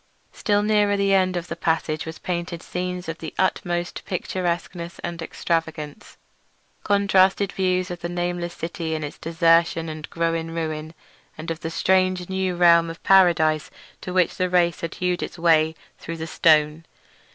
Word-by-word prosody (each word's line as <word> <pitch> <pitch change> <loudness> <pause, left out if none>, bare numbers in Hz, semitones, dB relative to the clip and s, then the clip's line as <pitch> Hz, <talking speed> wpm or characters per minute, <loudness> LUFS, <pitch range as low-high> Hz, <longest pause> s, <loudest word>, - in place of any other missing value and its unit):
Still 205 -1 +1
nearer 210 -1 +2
the 200 0 +2
end 185 -2 +2
of 175 0 -4
the - - -5
passage 160 -2 -1
were - - -3
painted 170 0 -4
scenes 180 0 -4
of 165 0 -5
the 160 - -7
utmost 175 -2 -1
picturesqueness 175 -2 -3
and 170 -1 -4
extravagance; 160 0 -3 0.7
contrasted 200 -1 +3
views 185 -1 0
of 175 - -5
the 170 - -4
nameless 175 0 -3
city 165 -1 -4
in 155 - -4
its 145 - -7
desertion 165 0 +2
and 155 0 -7
growing 165 -1 -2
ruin, 155 -1 -4 0.4
and 165 +2 -5
of 165 - -4
the 165 - -4
strange 185 +1 +1
new 190 -1 -1
realm 170 -1 +5
or 165 - -6
paradise 165 -5 +4 0.3
to 185 - -6
which 180 -1 +1
the 185 0 0
race 175 -1 +2
had 165 - -4
hewed 180 -1 -1
its - - -5
way 160 -1 +3 0.2
through 165 0 -6
the 160 - -4
stone. 155 -1 +3
170 Hz, 165 wpm, -23 LUFS, 165-185 Hz, 0.7 s, realm